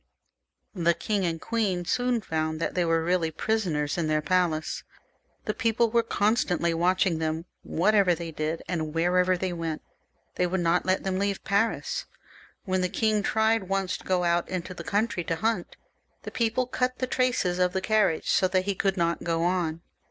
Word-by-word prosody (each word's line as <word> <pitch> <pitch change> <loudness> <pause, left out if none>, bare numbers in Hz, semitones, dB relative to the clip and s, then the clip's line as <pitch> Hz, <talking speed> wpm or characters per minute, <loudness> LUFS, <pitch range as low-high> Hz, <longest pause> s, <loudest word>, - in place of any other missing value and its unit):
The 170 -3 +2
king 205 0 -1
and 165 -1 -2
queen 200 -6 -1
soon 245 +3 +1
found 160 -3 -2
that 165 - -2
they 180 - +1
were 165 -1 +1
really 175 -1 +1
prisoners 160 -4 -1
in 165 - 0
their 155 0 +2
palace. 175 -4 0 0.6
The 215 - -1
people 230 +1 +1
were 235 0 +4
constantly 205 -6 +1
watching 175 0 +2
them, 160 +1 -2 0.2
whatever 195 0 +3
they 165 0 -6
did, 155 +1 -3
and 160 -3 -3
wherever 180 +2 +3
they 185 0 -2
went. 165 -2 -4 0.5
They 180 - +2
would 190 +2 -1
not 170 +2 +1
let 185 0 +1
them 190 -1 -1
leave 200 0 -1
Paris. 225 - 0 0.6
When 185 -2 0
the 180 - 0
king 215 +1 +1
tried 220 -1 +1
once 195 -1 0
to - - -16
go 185 -1 +1
out 170 0 +1
into 185 0 -4
the - - -8
country 205 -3 0
to 165 - -1
hunt, 220 0 -2 0.5
the - - -7
people 235 +2 0
cut 255 0 -1
the 255 - -1
traces 250 -9 0
of 180 0 +3
the 190 - +1
carriage, 210 -5 +1
so 185 - +3
that 185 0 0
he 200 - 0
could 195 0 0
not 170 -1 0
go 165 -1 0
on. 170 -2 0
185 Hz, 185 wpm, -27 LUFS, 170-210 Hz, 0.6 s, were